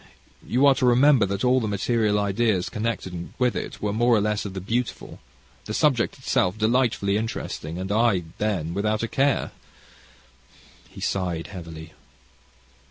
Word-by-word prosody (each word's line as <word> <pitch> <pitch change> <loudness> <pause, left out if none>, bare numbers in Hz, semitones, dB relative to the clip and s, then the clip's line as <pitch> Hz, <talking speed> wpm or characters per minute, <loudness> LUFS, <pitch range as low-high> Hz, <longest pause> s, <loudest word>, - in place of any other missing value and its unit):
You 130 +4 +2
are 140 - +7
to 130 -1 0
remember 125 -2 +5
that 100 +1 -3
all 130 +1 +4
the 110 - -2
material 105 +1 +1
ideas 100 -1 +1
connected 105 -6 -4
with 125 -2 +1
it - - -5
were 105 -1 0
more 120 +2 +3
or - - +3
less 105 0 -1
of 100 -1 -6
the - - -3
beautiful, 115 +6 -3 0.5
the 110 - -4
subject 135 -6 +2
itself 100 -7 0
delightfully 110 -3 +1
interesting, 90 -7 -4
and 95 +2 -4
I, 110 -4 +2 0.2
then, 95 -7 -1
without 105 +3 -1
a - - 0
care." 135 +3 +1 1.4
He - - -12
sighed 90 -4 -2
heavily. 80 -3 -9
105 Hz, 155 wpm, -24 LUFS, 95-120 Hz, 1.4 s, are